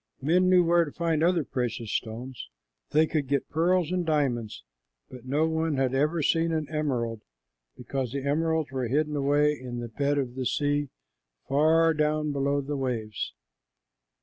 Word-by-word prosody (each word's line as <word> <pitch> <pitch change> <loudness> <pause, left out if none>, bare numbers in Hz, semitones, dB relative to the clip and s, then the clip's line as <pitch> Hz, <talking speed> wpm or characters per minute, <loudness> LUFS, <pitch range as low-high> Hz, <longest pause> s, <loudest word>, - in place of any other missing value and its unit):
Men 180 +6 +3
knew 180 -1 +6
where 170 0 +4
to 150 - -6
find 165 -1 0
other 170 -1 +3
precious 120 -4 -3
stones. 120 +3 -5 0.4
They 155 +1 +4
could 155 -3 -2
get 140 0 -1
pearls 175 +1 +2
and 180 -1 0
diamonds, 135 -9 -1 0.5
but 125 -1 -11
no 150 +4 +2
one 160 -2 -1
had 130 -1 +1
ever 150 +4 +1
seen 165 +2 +2
an 155 -2 -1
emerald, 125 -8 -2 0.6
because 125 0 -3
the 140 0 -3
emeralds 160 0 0
were 130 -2 -2
hidden 150 +4 0
away 145 +1 +3
in 125 -4 -7
the 120 -1 -5
bed 140 +5 0
of 130 -3 -2
the 130 -1 -2
sea, 145 -1 0 0.6
far 160 +4 +4
down 150 0 0
below 140 0 0
the 145 +2 -4
waves. 120 -5 -3
145 Hz, 165 wpm, -27 LUFS, 130-160 Hz, 0.6 s, knew